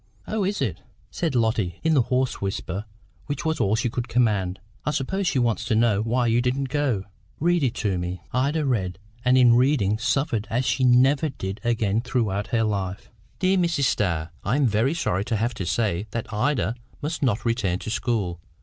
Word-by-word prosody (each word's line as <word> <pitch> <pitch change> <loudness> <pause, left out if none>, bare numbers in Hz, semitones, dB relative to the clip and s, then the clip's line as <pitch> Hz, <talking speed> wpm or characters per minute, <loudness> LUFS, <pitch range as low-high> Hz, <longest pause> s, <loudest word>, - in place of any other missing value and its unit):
"Oh, 215 -1 -1
is 195 -5 0
it?" 110 - -3 0.3
said 165 -6 -2
Lotty, 110 -6 0
in 160 - +3
the 140 - +5
hoarse 125 +2 0
whisper 95 0 -3 0.4
which 145 +3 -3
was 160 -1 0
all 100 +2 +2
she 120 +2 0
could 120 +1 -3
command 105 -6 +1 0.2
"I - - -1
suppose 180 +7 -1
she - - +1
wants 115 -2 +1
to 115 -2 +1
know 110 -2 +3
why 120 +3 +1
you 115 +1 +3
didn't 130 +2 -1
go. 135 -8 0 0.4
Read 175 +2 +2
it 130 -4 0
to 95 -5 -1
me." 90 0 -4
Ida 145 +4 +1
read, 95 -9 -1 0.3
and, 125 0 +4
in 125 -2 +7
reading, 120 -5 +3
suffered 120 -2 0
as 125 +3 0
she 120 +4 +1
never 130 +5 +4
did 95 -5 -6
again 115 -2 +1
throughout 110 -5 -1
her 115 -3 +1
life. 100 -3 -3 0.3
"DEAR 190 0 +2
MRS. 170 -5 +1
STARR, 90 -9 0
I 110 - +1
am 145 -1 +3
very 115 +7 +2
sorry 95 - 0
to 115 - -1
have 115 +3 0
to 90 - -4
say 100 +1 0
that 115 +1 -5
Ida 120 0 +1 0.3
must 160 +3 -3
not 120 -5 0
return 115 -6 +1
to 110 - -6
school. 105 -7 -1
120 Hz, 195 wpm, -24 LUFS, 105-135 Hz, 0.4 s, in